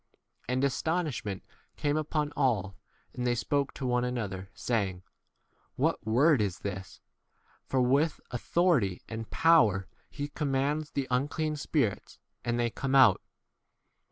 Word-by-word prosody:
And 130 +1 +1
astonishment 140 - -1 0.3
came 145 -1 0
upon 150 -1 -1
all, 105 -9 +1 0.4
and 125 0 -2
they 120 - +2
spoke 140 +3 0
to 135 - -5
one 125 -1 +1
another, 100 -7 -3
saying, 95 -6 -1 0.7
What - - 0
word 130 +4 +4
[is] 95 -3 -2
this? 95 -2 -6 0.7
for 130 - +1
with 140 +5 +2
authority 125 - +1
and 115 -1 -6
power 110 - +4 0.2
he 145 0 -5
commands 145 +1 -1
the 135 -2 -2
un 125 +3 +1
clean 155 +1 -2
spirits, 140 -7 -1 0.3
and 120 0 -1
they 120 -1 +1
come 135 +2 -2
out. 130 -8 +6
125 Hz, 130 wpm, -29 LUFS, 110-145 Hz, 0.7 s, out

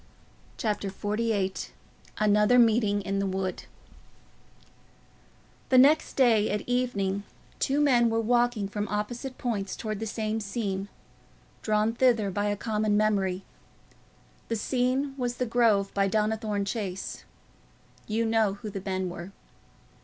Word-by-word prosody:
Chapter 210 -3 -1
XLVIII 205 -1 -1 0.6
Another 210 +3 +4
Meeting 215 -4 +3
in 195 0 -1
the 195 - 0
Wood 190 0 -3 2.0
The 255 - +5
next 290 +5 +5
day, 225 -5 +4
at 210 - -1
evening, 205 -6 0 0.4
two 275 +2 +1
men 245 -5 +4
were 225 0 +1
walking 240 -2 +1
from 205 +1 -3
opposite 240 +5 -4
points 205 -6 -2
towards 215 -3 -4
the 225 - -3
same 215 0 -2
scene, 200 -2 -3 0.7
drawn 215 +1 +1
thither 230 -5 +2
by 205 +2 -1
a 205 0 0
common 215 -1 0
memory. 195 -3 +1 1.0
The 230 - -1
scene 255 +4 0
was 245 -1 -1
the 250 - -1
Grove 225 -4 +2
by 195 0 +2
Donnithorne 215 0 0
Chase: 195 -3 -4 0.8
you 225 +2 0
know 220 -3 +2
who 210 0 -7
the 195 - -5
men 185 -1 -2
were. 175 +1 -7
215 Hz, 130 wpm, -27 LUFS, 200-235 Hz, 2.0 s, The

